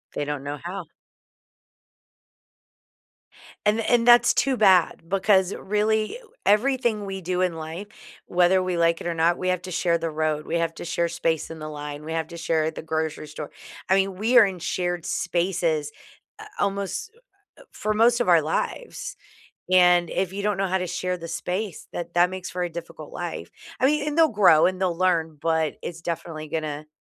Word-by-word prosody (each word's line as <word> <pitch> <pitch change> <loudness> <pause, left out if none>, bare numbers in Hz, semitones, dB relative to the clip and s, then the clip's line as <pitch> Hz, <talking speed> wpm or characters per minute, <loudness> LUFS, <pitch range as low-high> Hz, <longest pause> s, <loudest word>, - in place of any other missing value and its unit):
They 145 - -1
don't 145 -2 -4
know 145 +1 -4
how. 180 +1 -5 2.8
And 210 +2 +3
and 230 +1 +2
that's 240 0 +7
too 270 -2 +1
bad 190 -5 +4
because, 195 0 +3
really, 215 - 0 0.3
everything 225 -1 +2
we 190 -1 -5
do 180 +1 -2
in 180 -2 +1
life, 165 +5 -6 0.4
whether 180 +1 +3
we 185 -1 -1
like 170 0 +2
it - - -5
or 170 - -1
not, 165 +1 +2
we 185 - -3
have 180 -1 0
to 185 - -7
share 170 -1 +1
the 165 0 -3
road. 155 -1 -1
We 165 - -3
have 165 -1 -1
to - - -7
share 170 0 0
space 165 -1 -1
in 165 - -8
the 155 0 -6
line. 145 0 -7
We 160 - -6
have 160 -1 -2
to 170 - -9
share 160 -1 0
at 160 - -3
the - - -5
grocery 160 -1 -3
store. 150 0 -8 0.4
I 190 - +5
mean, 195 0 +1
we 225 +6 +3
are 230 - +9
in 190 -2 -4
shared 175 0 -2
spaces, 170 -4 0 0.5
uh, 430 - -9
almost, 200 - -2 0.5
uh, - - -14
for 215 - -2
most 235 +3 +4
of 240 - 0
our 170 -3 +6
lives. - - -3 0.6
And 180 -1 +5
if 185 -1 -1
you 200 +1 -4
don't 210 -1 0
know 195 - +1
how 190 0 0
to 180 - -3
share 180 +1 -2
the 170 -1 -8
space, 180 +3 -4
that 170 0 -6
that 175 +1 +4
makes 185 -1 -6
for 180 - -3
a - - -2
difficult 170 0 -9
life. - - -5 0.3
I 260 - +5
mean 295 +1 +1
and 300 +1 -2
they'll 325 -1 +6
grow 195 - +5
and 185 0 -1
they'll 180 -3 0
learn, 165 -4 +1
but 160 -1 0
it's 165 -1 -7
definitely 165 -2 -5
gonna 155 -1 -4
180 Hz, 195 wpm, -24 LUFS, 160-200 Hz, 2.8 s, are